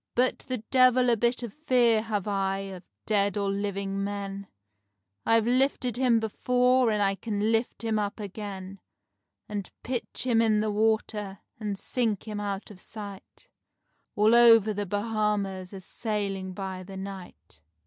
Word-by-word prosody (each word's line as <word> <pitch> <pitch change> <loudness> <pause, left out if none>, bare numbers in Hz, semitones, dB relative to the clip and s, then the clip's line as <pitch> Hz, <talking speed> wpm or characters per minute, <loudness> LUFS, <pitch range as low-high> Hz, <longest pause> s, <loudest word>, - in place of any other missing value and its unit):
"But 250 +1 +2
the 255 - -1
devil 255 -1 +5
a - - +4
bit 240 +2 0
of 230 -4 -6
fear 245 -7 +3
have 215 -3 -3
I 195 -1 0 0.2
of 180 -1 -10 0.2
dead 205 -2 +1
or 200 -1 0
living 195 0 -2
men, 200 -1 -4 0.8
I've 225 -1 +4
lifted 250 -1 +1
him 245 -3 +3
before 250 +3 +2
and 210 -1 +1
I 195 0 +2
can 210 +1 -1
lift 230 +1 -1
him 220 -1 0
up 205 +1 -3
again, 195 -2 -7 0.7
And 205 -3 -5
pitch 245 -1 -3
him 235 -3 +3
in 220 -2 +3
the 215 0 0
water, 210 -2 0 0.2
and 210 -3 -3
sink 225 -2 -1
him 210 -1 -4
out 200 0 -4
of 190 -2 -14
sight, 205 -3 -9 0.7
All 215 +2 +4
over 225 -3 +7
the 205 0 -3
Bahamas 205 -2 -1
a 195 -2 -8
sailing 195 -2 -3
by 190 -1 -5
the 190 +1 -9
night." 185 - -9
210 Hz, 155 wpm, -27 LUFS, 195-230 Hz, 0.8 s, over